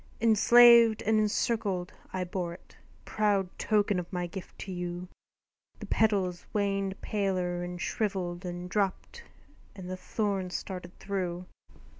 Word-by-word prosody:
Enslaved 230 0 +7
and 220 0 +3
encircled, 210 -3 0 0.2
I 185 -1 -2
bore 175 -1 -4
it, - - -19 0.3
Proud 205 -3 +1
token 205 -3 +2
of 175 - -7
my 180 -2 -2
gift 180 +1 -9
to 195 - -6
you. 175 0 -5 0.7
The - - -7
petals 195 -5 +1
waned 195 -2 -1
paler, 185 -4 -1
and 175 0 -5
shriveled, 185 -3 -2
And 175 0 -5
dropped; 200 - -2 0.5
and 190 -2 -8
the 185 - -4
thorns 190 -1 -2
started 180 -2 -6
through. 185 -3 -3
190 Hz, 130 wpm, -29 LUFS, 180-210 Hz, 0.7 s, Enslaved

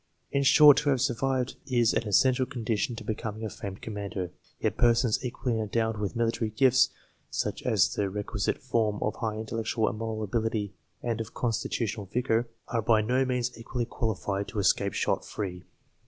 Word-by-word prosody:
In 140 - +2
short, 145 +1 +8
to 145 - +1
have 135 -2 +2
survived 130 +1 0
is 120 -4 +3
an 115 - 0
essential 130 +5 +3
condition 115 0 -1
to 115 - -7
becoming 110 0 -4
a 110 - -4
famed 95 -1 -7
commander; 100 -4 -4 0.3
yet - - 0
persons 120 -1 +3
equally 120 -2 -2
endowed 110 0 -1
with 100 -2 -3
military 115 -1 0
gifts 130 +3 +4 0.4
such - - -2
as - - +2
the 100 -2 0
requisite 100 0 -2
form 110 -5 +1
of 105 0 -1
high 110 -2 -2
intellectual 110 +2 -1
and 105 - -3
moral 110 -1 -3
ability 110 -1 -1 0.3
and 115 -2 -1
of 110 - -8
constitutional 115 -3 -2
vigour 120 +2 0 0.2
are 115 -1 0
by 110 0 +4
no 125 +5 +1
means 125 -1 -1
equally 120 +1 -3
qualified 100 -3 -2
to - - -7
escape 100 -4 +2
shot - - 0
free. 90 -4 -5
115 Hz, 170 wpm, -28 LUFS, 105-125 Hz, 0.4 s, short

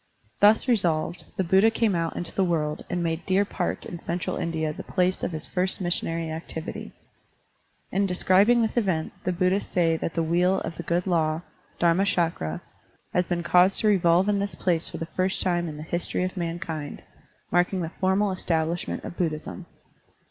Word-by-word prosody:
Thus 215 +5 +5
resolved, 175 -7 +1
the 190 - +2
Buddha 190 +5 +5
came 225 -2 +1
out 165 -1 -1
into 175 - -5
the 195 - +2
world 155 -4 -1
and 175 -1 -1
made 165 0 -2
Deer 195 +2 +3
Park 180 -3 -3
in 175 - -7
Central 175 +2 -3
India 160 -2 -2
the - - -7
place 185 0 0
of - - -2
his 155 -1 -5
first 185 0 -1
mis 175 -2 0
sionary 165 -1 -3
activity. 160 0 -6 1.0
In 195 +1 +1
describing 195 +6 +4
this 225 - -2
event, 185 -8 0
the 185 - +1
Buddhists 185 +2 0
say 165 -2 +2
that 165 - -4
the 165 - +1
Wheel 175 +3 +2
of 165 - -5
the - - -3
Good 170 +2 0
Law, 165 -3 +1 0.4
Dharmachakra, 170 - +1 0.5
has 180 -1 +1
been 175 -1 -1
caused 180 +2 +4
to 215 - +2
revolve 180 -1 +4
in 205 -1 +2
this 200 0 -3
place 170 -3 0
for - - -6
the 165 - -4
first 185 +3 -1
time 175 -2 0
in 150 - -7
the 150 - -6
history 175 +2 -1
of 185 +1 -3
mankind, 165 -4 -4 0.5
marking 180 +1 +2
the 165 -1 -4
formal 195 +1 +2
establishment 170 -2 -1
of - - -7
Buddhism. 155 -4 -3
175 Hz, 185 wpm, -26 LUFS, 165-190 Hz, 1.0 s, Thus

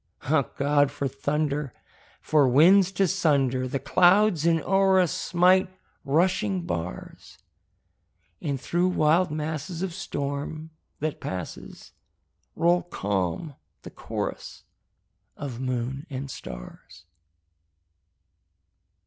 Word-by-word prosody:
Ah, 140 -2 +1
God! 145 0 +3
for 140 - -3
thunder! 145 0 -2 0.5
for 150 -3 +3
winds 180 +9 +5
to 195 +1 +2
sunder 135 -6 +1
The 130 - -2
clouds 180 +4 +3
and 165 -1 +3
o'er 195 0 +3
us 180 -4 +2
smite 180 +2 +3 0.3
rushing 135 - +1
bars! 85 -7 -6 1.0
And 140 -2 -2
through 175 +6 0
wild 175 0 +2
masses 155 +3 -4
of 185 -3 -3
storm, 155 -3 -5 0.3
that 155 0 -3
passes, 90 -2 -7 0.6
Roll 175 +1 +3
calm 100 - -3 0.3
the - - -9
chorus - - -6 0.7
of 135 -5 -6
moon 130 +3 -3
and 135 0 -5
stars. - - -10
150 Hz, 100 wpm, -26 LUFS, 130-175 Hz, 1.0 s, winds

